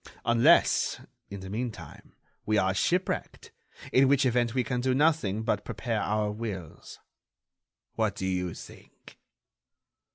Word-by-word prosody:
Unless, 120 +9 +4 0.3
in 100 -1 -7
the 95 - -8
meantime, 115 +1 -7 0.3
we 110 0 +1
are 95 -1 +2
shipwrecked, 180 - -2 0.4
in 130 +1 +5
which 140 0 +3
event 120 -1 +1
we 130 - +2
can 125 -1 -2
do 130 0 +1
nothing 135 -9 +1
but 115 - -1
prepare - - -3
our 105 +1 0
wills. 105 -7 -7 1.0
What - - -1
do 95 - -4
you 90 -2 -2
think?" - - -14
115 Hz, 130 wpm, -28 LUFS, 100-130 Hz, 1.0 s, in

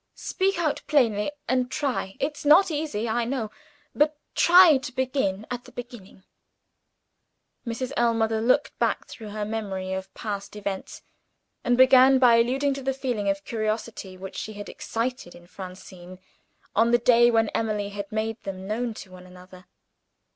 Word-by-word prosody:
"Speak 390 0 -1
out 310 -4 -1
plainly; 230 -8 +2 0.2
and 255 -1 +1
try 255 -9 -2
it's 290 +1 -3
not 330 +5 +6
easy, 290 -8 -2
I 235 +2 0
know 230 -3 -3 0.4
but 300 0 +2 0.2
try 350 -3 +7
to 265 0 -7
begin 255 -6 -1
at 245 0 -5
the - - -14
beginning." 235 -6 -10 1.4
Mrs. 245 +3 -3
Ellmother 225 -2 +1
looked 255 +5 +2
back - - 0
through 220 -3 -10
her 210 0 -4
memory 195 -4 -4
of 190 0 -5
past 205 -1 -5
events, 200 -2 -6 0.6
and 245 0 +2
began 260 +1 +7
by 245 -3 +6
alluding 265 +4 +1
to 275 - -6
the 265 0 -2
feeling 240 -7 -2
of 195 0 -2
curiosity 215 -3 -4
which 190 +1 -9
she 215 - -5
had 205 0 -8
excited 235 -4 -4
in 175 - -15
Francine, 185 0 -11 0.6
on 225 +2 +4
the 240 - +5
day 240 0 +5
when 225 -2 +2
Emily 210 -2 -2
had 200 0 -7
made 220 +1 -3
them 190 -1 -7
known 225 +2 -2
to 190 - -10
one 185 0 -13
another. 180 0 -15
225 Hz, 160 wpm, -25 LUFS, 200-260 Hz, 1.4 s, try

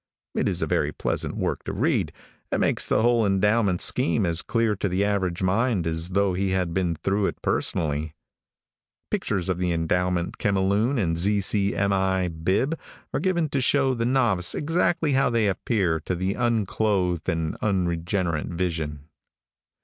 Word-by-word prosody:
It - - 0
is - - -1
a - - +2
very - - 0
pleasant - - -3
work - - -2
to - - -3
read, - - 0 0.4
and - - 0
makes - - +2
the - - +2
whole 120 -1 +3
endowment 100 -1 +2
scheme 85 +4 +1
as 85 0 0
clear 115 -2 0
to 100 - -1
the 95 +3 +1
average 95 -3 -1
mind 100 0 +1
as 80 +1 -3
though 100 0 +1
he 95 +2 0
had 90 -3 0
been 90 -3 0
through 95 +5 0
it - - -5
personally. 75 0 -1 1.0
Pictures 95 -4 -1
of 90 -2 -1
the 90 -1 0
endowment 85 +1 -1
chemiloon 100 +6 +1
and 85 -6 0
Z. 100 +3 +2
C. 100 0 0
M. 100 0 +1
I. 95 -1 +1
bib 95 - -1 0.3
are - - 0
given 175 -4 +1
to 140 -1 0
show 135 +1 +3
the 115 -1 -1
novice 115 -9 +2
exactly 165 0 +1
how 135 -1 +3
they 115 -2 +1
appear 95 -3 0
to 85 +4 -3
the 95 +2 -1
unclothed 105 -6 0
and 80 -1 -1
unregenerate 85 -3 -1
vision. 80 -5 -3
95 Hz, 165 wpm, -25 LUFS, 85-110 Hz, 1.0 s, whole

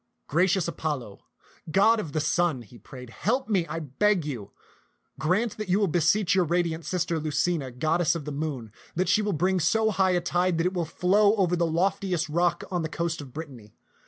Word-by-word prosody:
" - - -51
Gracious 175 +2 +2
Apollo, 145 -11 -4 0.5
god 215 +7 +4
of 160 -8 -5
the 155 - -1
sun," 155 -3 0
he 115 +2 -16
prayed, 125 +2 -11
help 250 - -1
me, 190 -6 +1
I 155 - -4
beg. 170 +4 +1 0.9
Grant 195 +9 0
that 215 -3 -5
you 190 +3 +3
will 205 - +3
beseech 180 +4 +2
your 185 -1 +3
radiant 170 -1 -1
sister 170 -2 -1
Lucina, 150 -1 -1
goddess 155 +7 +1
of 160 -4 -5
the 150 - -4
moon, 140 -7 -4 0.2
that 185 +3 0
she 215 - +3
will 210 0 -1
bring 185 +4 +1
so 220 +7 +2
high 190 -2 +2
a - - +3
tide 175 0 0
that 165 - 0
it 180 - 0
will 175 -3 -1
flow 200 +6 +3
over 180 -4 +2
the 170 -1 +1
loft 185 +5 0
iest 175 -5 -1
rock 175 0 +1
on 180 -2 0
the 160 - -3
coast 170 -1 -3
of 135 -3 -11
Brittany. 130 -8 -10
170 Hz, 205 wpm, -26 LUFS, 155-190 Hz, 0.9 s, god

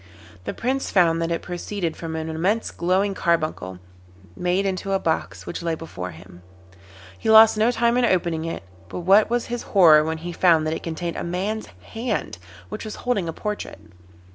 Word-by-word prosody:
The - - -3
Prince 265 +3 -1
found 165 -3 +3
that 165 - -1
it 170 - -2
proceeded 175 -1 -4
from 165 -1 -6
an 160 0 -3
immense 185 +8 -1
glowing 190 +3 +1
carbuncle, 155 - -1 0.6
made 180 +2 0
into 195 0 -2
a 195 - +2
box, 160 -3 -2
which 170 - -5
lay 165 -1 -1
before 95 - -7
him. 85 +1 -13 0.8
He - - -2
lost 220 0 +8
no 215 +2 +3
time 235 0 +2
in 250 - +3
opening 170 -6 +1
it, 165 - -5 0.3
but 180 - -5
what 195 +5 +5
was 240 0 0
his 240 0 -4 0.2
horror 155 -5 +8
when 160 +1 -2
he 175 +2 -6
found 165 -3 +4
that 155 - 0
it - - -4
contained 170 0 -4
a - - -3
man's 190 +6 -3 0.3
hand, 225 - -3 0.3
which - - -6
was 215 -1 -6
holding 205 -9 0
a - - -4
portrait. 210 +4 -5
175 Hz, 190 wpm, -23 LUFS, 160-210 Hz, 0.8 s, lost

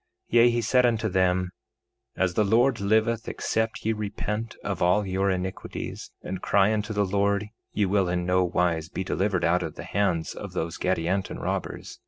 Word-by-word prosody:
3:15 - - -13
Yea, 120 0 +7
he 120 0 +1
said 125 +3 +3
unto 115 -2 +2
them: 90 -1 +1 0.7
As 95 -2 +1
the 105 - +3
Lord 115 +4 +3
liveth, 110 +3 +1
except 110 -1 -2
ye 110 - +2
repent 105 +1 -4
of 100 -3 -3
all 90 +4 +3
your 95 +1 0
iniquities, 95 0 -4
and 95 0 -5
cry 100 +2 +3
unto 105 0 -2
the 105 -1 +1
Lord, 100 +1 0 0.2
ye 105 - +1
will 95 -1 +1
in 90 0 -1
no 90 +1 +3
wise 85 -2 0
be 95 - -3
delivered 95 -1 0
out 90 +2 +3
of 80 -3 -5
the - - -7
hands 85 -6 0
of - - -8
those 80 +1 -3
Gadianton 95 +1 -1
robbers. - - -4
100 Hz, 185 wpm, -26 LUFS, 90-110 Hz, 0.7 s, Yea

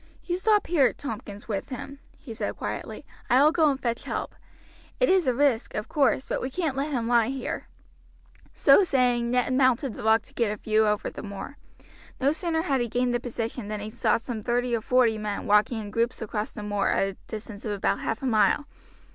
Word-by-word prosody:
"You 350 - -1
stop 420 +2 +3
here, 290 -7 +3
Tompkins, 215 -6 -7
with 205 -4 -3
him," 275 +2 -7 0.2
he 235 - -9
said - - -4
quietly, - - -5 0.2
"I 255 +3 +5
will 305 - +6
go 320 -2 +4
and 270 -2 -1
fetch 235 -3 -2
help. - - -4 0.7
It - - +3
is 370 -5 +3
a 255 - +3
risk, 270 -4 +1
of 210 +2 -3
course, 275 -2 +1
but - - -2
we 260 - -2
can't 310 -1 -2
let 280 +3 -1
him 240 -5 -1
lie 235 -2 +4
here." 265 0 -4 0.8
So - - +5
saying, 245 -7 +2
Ned 250 +1 +1
mounted 260 -1 +2
the - - -8
rock 220 +1 +3
to - - -19
get 230 -3 0
a 210 - -4
view 215 +1 +2
over 210 0 0
the - - -8
moor. 200 +7 -7 0.6
No 275 +1 +3
sooner 325 0 -1
had 275 -7 +1
he 240 - 0
gained 245 +2 0
the 240 - +1
position 235 -2 -4
than 210 0 -4
he 210 +1 -6
saw - - +2
some 230 -1 -5
thirty 245 +2 0
or 225 - -2
forty 235 -2 +3
men 210 -1 -3
walking 210 +3 +3
in 205 -2 -7
groups 230 +2 0
across 215 -1 -3
the 210 - -8
moor 205 -1 0
at 195 - +2
a - - -7
distance 215 -1 -8
of 215 - -3
about 200 - 0
half 225 - -3
a - - -1
mile. 245 +4 +3
240 Hz, 220 wpm, -26 LUFS, 215-270 Hz, 0.8 s, will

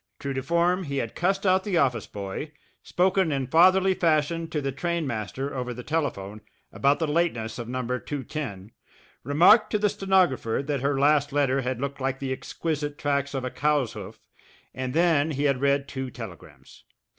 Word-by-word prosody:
True 140 -1 -4
to 130 - -2
form, 170 +5 +1
he 140 -1 -3
had 115 -4 -2
cussed 195 +3 0
out 190 0 +3
the 190 -4 0
office 125 -8 +1
boy, 100 +9 -6 0.3
spoken 185 -1 +1
in 135 -2 -1
fatherly 185 +7 +5
fashion 165 -1 +1
to 150 - -2
the 135 -1 -2
trainmaster 135 - -3
over 125 -1 -3
the 125 - -8
telephone 110 -10 -3 0.3
about 140 +1 +2
the 165 - 0
lateness 150 -9 -1
of 120 -1 -6
No. 130 0 -2
210, 125 -4 -5 0.5
remarked 170 - +5
to 210 - +1
the 210 0 +2
stenographer 180 -12 +1
that 145 -3 -2
her 140 0 0
last 145 0 +3
letter 135 -1 +1
had 130 -1 -3
looked 140 0 -4
like 135 0 -1
the 135 -1 -4
exquisite 145 +1 -4
tracks 140 -1 -1
of 130 -1 -2
a 125 - -3
cow's 145 -5 +1
hoof - - -9 0.5
and 130 0 -4
then 165 -3 +3
he 145 -2 -2
had 140 -3 +1
read 140 0 +2
two 130 -2 -5
telegrams. 115 -9 -11
140 Hz, 180 wpm, -26 LUFS, 130-165 Hz, 0.5 s, fatherly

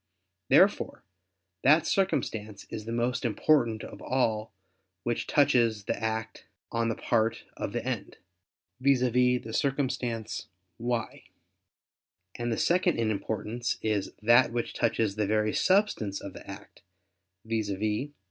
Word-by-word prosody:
Therefore - - +4 0.6
that 155 +4 +5
circumstance 110 - -1
is 110 - -5
the 115 - -5
most 120 +2 0
important 120 -2 +2
of - - -9
all 110 -4 0 0.5
which 120 -1 -2
touches 115 -7 +3
the - - -1
act 110 0 -4 0.2
on 115 0 0
the 115 - -1
part 115 -1 0
of - - -4
the - - -3
end, - - -4 0.6
viz. 135 -1 +3
the 125 -1 +2
circumstance 125 -6 -1 0.3
"why": 120 -1 -3 1.1
and 120 0 -3
the 115 - -1
second 175 0 +2
in 115 -2 +1
importance, 110 +3 -2
is 105 -3 0
that 120 +2 +6
which 120 0 -2
touches 110 -3 0
the 105 -2 +1
very 110 +1 +1
substance 185 - +2
of 100 - -8
the - - -11
act, - - -11 0.6
viz. 110 -2 -1
115 Hz, 130 wpm, -28 LUFS, 110-125 Hz, 1.1 s, that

